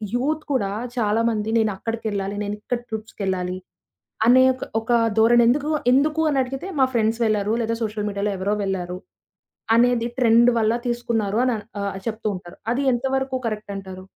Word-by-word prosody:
Youth 300 +5 0
కూడా 200 -7 0 0.3
చాలామంది 220 -1 +1
నేనక్కడికెళ్ళాలి, 210 -1 -2
నేనిక్కడ 210 +4 -3
ట్రిప్స్‌కెళ్ళాలి. 190 -4 -3 0.7
అనే 255 +2 +7
ఒక 255 - -8 0.2
ఒక 225 +2 -1 0.2
ధోరణి 235 +2 +6
ఎందుకు 285 +5 +2 0.2
ఎందుకు 300 +4 +3
అని 285 - 0
అడిగితే 265 +6 -4
"మా 265 - +6
ఫ్రెండ్స్ 225 0 +1
ఎళ్లారు, 210 -1 0
లేదా 230 0 -1
సోషల్ 215 -1 -2
మీడియాలో 200 +1 -2
ఎవరో 195 +3 0
వెళ్లారు, 180 -2 -3 0.8
అనేది 240 0 +3
ట్రెండ్ 235 0 +5
వల్ల 220 0 +2
తీసుకున్నారు" 230 -3 -1
అన్ 255 - +2 0.3
ఆహ్ 200 -1 -3
చెప్తూ 220 -1 -3
ఉంటారు. 175 -1 -11
అది 260 +4 0
ఎంతవరకు 265 +1 -1
కరెక్ట్ 215 -2 -4
అంటారు? 190 -1 -8
225 Hz, 145 wpm, -23 LUFS, 205-245 Hz, 0.8 s, అనే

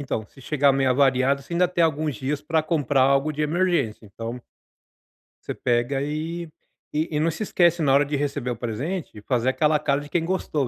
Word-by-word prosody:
então, 120 -6 -3
se 135 - -18
chegar 140 +2 +2
meio 135 -1 +2
avariado, 135 +1 +3
você 170 - -7
ainda 180 +1 +4
tem 175 -1 0
alguns 155 -2 +1
dias 140 +3 -3
pra 160 +1 0
comprar 145 -4 +1
algo 140 +3 +3
de 150 - -5
emergência. 155 -9 0
Então 115 +4 -7 1.1
você - - -3
pega 120 +2 0
e 160 +3 -4 0.4
e 155 0 -1
não 160 +2 +2
se 165 +7 -4
esquece, 175 -4 +2
na 140 -3 +3
hora 140 +1 +5
de 145 +1 -2
receber 140 -3 -2
o 120 - -1
presente, 130 - -4
de 105 - -11
fazer 125 +3 0
aquela 150 +3 +2
cara 145 -1 0
de 145 - -10
quem 165 0 0
gostou, 160 -6 -1
145 Hz, 200 wpm, -24 LUFS, 130-160 Hz, 1.1 s, hora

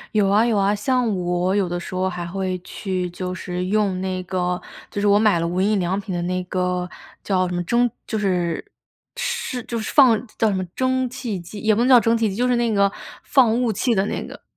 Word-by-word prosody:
有 205 -2 +4
啊， 210 +4 +4
有 225 -3 +1
啊， 200 +1 +2
像 250 +3 +1
我 180 +2 0
有 190 -4 +1
的 175 0 -2
时 185 - -7
候 185 +1 0
还 175 -1 -5
会 185 0 -3
去 185 -3 -3
就 180 +1 -4
是 180 0 -4
用 200 -2 +1
那 185 -1 -2
个 180 -1 -2 0.3
就 205 - -4
是 205 - +1
我 200 0 +5
买 210 -5 +3
了 170 - -1
无 180 +2 -1
印 205 0 +2
良 180 +2 0
品 190 -1 -6
的 175 - -2
那 185 +1 -1
个 180 -1 -1 0.3
叫 185 -2 +1
什 180 - -3
么 175 - -1
蒸 240 +5 +2 0.2
就 220 - -2
是 185 - -1 0.4
是 250 -2 -3
就 230 -1 -4
是 215 - -4
放 250 -7 +6 0.2
叫 220 - +3
什 - - 0
么 185 -1 -2
蒸 260 -1 +1
汽 240 -7 -4
机 190 +5 -9
也 220 0 +3
不 215 - 0
能 250 - +3
叫 255 -2 +8
蒸 230 +1 +3
汽 225 -2 +1
机， 190 - -5
就 245 +3 +1
是 250 -1 +2
那 240 -1 +1
个 200 -1 +3 0.3
放 245 -2 +3
雾 235 -3 +1
气 230 +3 0
的 195 +1 +2
那 - - -3
个。 - - -11
195 Hz, 260 characters per minute, -22 LUFS, 180-225 Hz, 0.4 s, 叫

